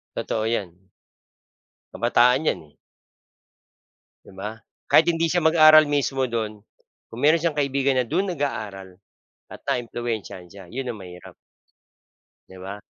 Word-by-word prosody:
Totoo 110 0 -2
yan. 95 -4 -4 1.1
Kabataan 125 +4 +3
'yan - - 0
eh. - - -35 1.5
'Di - - -16
ba? 105 +4 -7 0.3
Kahit 165 +2 +4
hindi 165 0 +1
siya 175 +1 0
mag-aral 155 -2 +7
mismo 135 -2 0
do'n, 110 -3 -4 0.5
kung 115 - -10
meron 155 +3 +4
siyang 165 -3 -1
kaibigan 140 -1 +1
na 125 - 0
do'n 190 - -1
nag-aaral, 110 - -4 0.6
at - - -10
naimpluwensiyahan 115 -6 -4
siya, 100 -2 -12
'yon 125 +5 -5
ang 110 - -7
mahirap. 90 -1 -12 1.1
'Di 95 - -14
ba? 100 +2 -7
120 Hz, 130 wpm, -23 LUFS, 105-150 Hz, 1.5 s, mag-aral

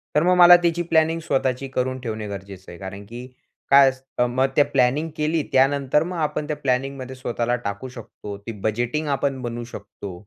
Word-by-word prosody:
तर 150 - +4
मग 180 +1 +4
मला 175 0 +10
त्याची 170 0 +1
प्लॅनिंग 165 0 +2
स्वतःची 135 -3 -1
करून 130 0 -2
ठेवणे 110 -3 -5
गरजेचं 100 -2 -9
आहे, 85 - -10
कारण 100 +1 -8
की 120 +4 -9 0.4
काय 140 -1 +7
अस 130 0 -9 0.3
मग 130 +2 +1
त्या 145 - +5
प्लॅनिंग 140 +3 +1
केली 155 +1 0
त्यानंतर 140 +2 +3
मग 180 0 -5
आपण 150 -1 -2
त्या 150 - -2
प्लॅनिंगमध्ये 130 -1 -2
स्वतःला 120 -1 -2
टाकू 100 +5 -4
शकतो. 105 -4 -9
ते 100 +3 -8
बजेटिंग 120 +8 -1
आपण 135 -1 -1
बनवू 120 -1 -4
शकतो 100 -4 -9
130 Hz, 180 wpm, -22 LUFS, 120-150 Hz, 0.4 s, मला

